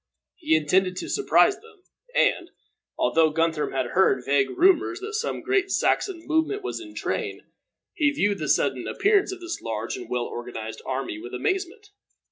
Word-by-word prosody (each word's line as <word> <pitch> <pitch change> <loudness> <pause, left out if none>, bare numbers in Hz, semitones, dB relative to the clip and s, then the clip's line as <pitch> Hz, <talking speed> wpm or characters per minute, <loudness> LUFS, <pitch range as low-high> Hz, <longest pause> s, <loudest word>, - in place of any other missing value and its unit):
He 310 - +2
intended 180 +4 +2
to - - -5
surprise 405 -1 +3
them; 435 -4 -19 0.3
and, - - +2 0.5
although 160 -1 +3
Guthrum 160 0 0
had 130 -2 -2
heard 135 -9 +3
vague 140 -1 +2
rumors 355 - +3
that 415 +3 -6
some 465 +2 -2
great 395 0 +1
Saxon 370 -3 0
movement 320 +6 0
was - - -4
in 320 -2 -11
train, - - -3 0.5
he 300 -2 +2
viewed 205 -8 0
the - - -3
sudden - - +1
appearance 405 -1 +2
of 380 -1 -8
this 345 0 -5
large 110 0 -3
and - - -8
well 125 -1 -1
organized 115 -2 -7
army 130 -5 -3
with 120 +3 -7
amazement. 385 - -3
290 Hz, 165 wpm, -25 LUFS, -, 0.5 s, surprise